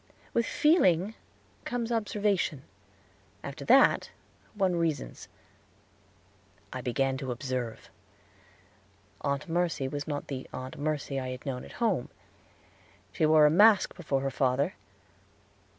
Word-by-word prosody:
With 235 - +1
feeling 210 - +3 0.5
comes 240 -1 -3
observation; 205 - 0 0.8
after 140 0 -7
that, 265 +3 +5 0.5
one 190 -3 +1
reasons. 165 -3 -2 1.5
I - - -4
began 135 +2 0
to 135 -1 -5
observe. 125 -2 -4 1.3
Aunt 140 +1 -1
Mercy 165 -5 0
was 145 +2 -5
not 145 -2 -3
the 130 -2 -5
Aunt 130 +2 -7
Merce 150 -1 -2
I 135 -2 -2
had 130 0 -7
known 130 -3 -3
at - - -12
home. 205 - 0 1.0
She 155 - +1
wore 155 -1 +6
a 150 - +5
mask 205 +4 +5
before 145 -6 -1
her 135 0 -1
father. 130 +1 +1
150 Hz, 120 wpm, -29 LUFS, 135-190 Hz, 1.5 s, wore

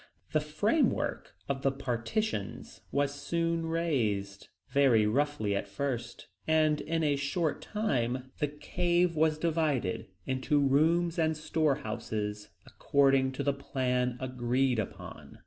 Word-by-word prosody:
The 155 - +3
framework 205 - 0
of 135 -1 -2
the 135 - +2
partitions 130 - -3
was 140 0 +1
soon 165 +3 -1
raised, 110 -13 -1 0.2
very 130 -6 +4
roughly 115 -3 +1
at 100 - -2
first, 120 +3 -4 0.2
and 155 -1 +3
in 165 0 -1
a 145 -2 +3
short 145 +3 -1
time, 130 - -1
the 150 - +1
cave 175 +4 0
was 155 0 +3
divided 155 - 0 0.2
into 130 +3 +1
rooms 165 +5 +3
and 160 -1 +2
storehouses, 110 - -2 0.2
according 135 -2 +2
to - - -3
the 140 - +2
plan 125 -2 -1
agreed 125 -1 0
upon. 105 - -7
140 Hz, 120 wpm, -30 LUFS, 125-160 Hz, 0.2 s, very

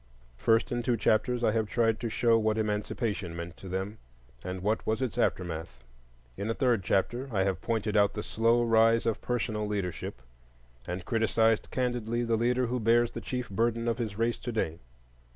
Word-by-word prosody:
First, 115 - +2
in 120 0 0
two 120 0 +1
chapters 120 +3 +1
I 110 - +4
have 110 -1 0
tried 115 -2 +2
to 115 - -2
show 115 +1 +3
what 110 -1 +2
Emancipation 105 -3 -2
meant 85 +1 -6
to 95 - -9
them, 95 +4 -3 0.4
and 90 0 -5
what 110 +2 0
was 110 0 0
its 130 -3 -2
aftermath. 80 -8 -2 0.5
In 100 - -4
a 115 - 0
third 120 -6 +2
chapter 120 +9 0
I 95 -3 +2
have 95 -3 -1
pointed 110 -2 -1
out 100 -1 +4
the 105 - -3
slow 115 +2 +2
rise 115 0 +4
of 115 -2 0
personal 110 -3 -1
leadership, 95 -10 -3 0.7
and 90 +1 -4
criticized 115 -1 +2
candidly 120 -2 -1
the 115 -1 +1
leader 125 +3 +1
who 125 +1 -1
bears 115 +1 +3
the - - -6
chief 125 -1 -3
burden 115 +3 0
of 115 +1 0
his 110 -4 -3
race 115 +1 0
to 120 - -4
day. 85 -7 -2
110 Hz, 190 wpm, -29 LUFS, 100-120 Hz, 0.7 s, I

